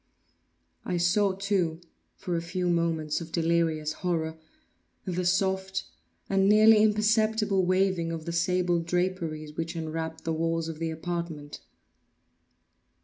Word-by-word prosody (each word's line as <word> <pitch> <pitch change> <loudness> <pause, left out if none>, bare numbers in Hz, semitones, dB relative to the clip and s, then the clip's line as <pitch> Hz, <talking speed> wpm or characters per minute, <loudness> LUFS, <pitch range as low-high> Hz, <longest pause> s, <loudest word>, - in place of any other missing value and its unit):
I 180 - -2
saw, 190 +3 +2
too, 190 -4 -1 0.4
for 180 - -3
a 165 - 0
few 175 +1 -1
moments 165 -2 0
of 165 -1 -8
delirious 165 -2 +1
horror, 160 -2 -2 0.7
the 180 -1 -1
soft 190 +1 0 0.4
and 195 0 +3
nearly 215 +1 +7
imperceptible 215 -1 +2
waving 185 -3 +1
of 160 -1 -5
the 170 - -3
sable 175 0 +1
draperies 165 -3 -2
which 165 +1 -4
enwrapped 160 0 -4
the 165 - -1
walls 165 0 -1
of 160 -1 -6
the 165 0 -1
apartment. 160 -2 -5
170 Hz, 125 wpm, -28 LUFS, 165-190 Hz, 0.7 s, nearly